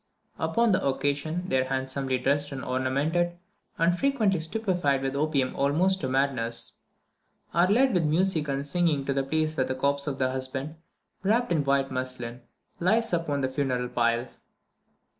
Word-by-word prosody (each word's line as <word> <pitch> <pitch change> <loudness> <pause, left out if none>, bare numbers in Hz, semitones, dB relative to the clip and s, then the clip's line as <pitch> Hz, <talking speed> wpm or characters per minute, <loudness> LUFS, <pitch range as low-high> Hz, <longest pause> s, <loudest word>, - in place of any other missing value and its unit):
Upon 235 -1 +2
the 185 0 +2
occasion, 145 +6 -1
they 130 - +2
are 130 - +1
handsomely 130 0 -1
dressed 145 +3 +1
and 135 -1 -5
ornamented, 145 +7 0 0.4
and 170 +1 +3
frequently 220 -7 +1
stupefied 165 -6 0
with 135 0 -2
opium 140 -3 0
almost 175 +7 +2
to 130 - -2
madness; 130 -4 -1 0.8
are 175 +2 +4
led 255 +6 +3
with 175 -4 +2
music 160 0 +1
and 140 0 -2
singing 150 -2 +1
to 140 - 0
the 135 - +1
place 155 +3 -1
where 130 - +2
the 130 - -2
corpse 140 +2 0
of 140 -2 -2
the 130 -1 +1
husband, 130 +4 -4 0.4
wrapped 225 +4 +1
in 160 -4 +2
white 140 -1 +1
muslin, 130 -2 -4 0.4
lies 220 +4 +2
upon 155 -4 0
the 130 - +1
funeral 130 -2 -1
pile. 120 +1 +1
140 Hz, 160 wpm, -27 LUFS, 130-175 Hz, 0.8 s, are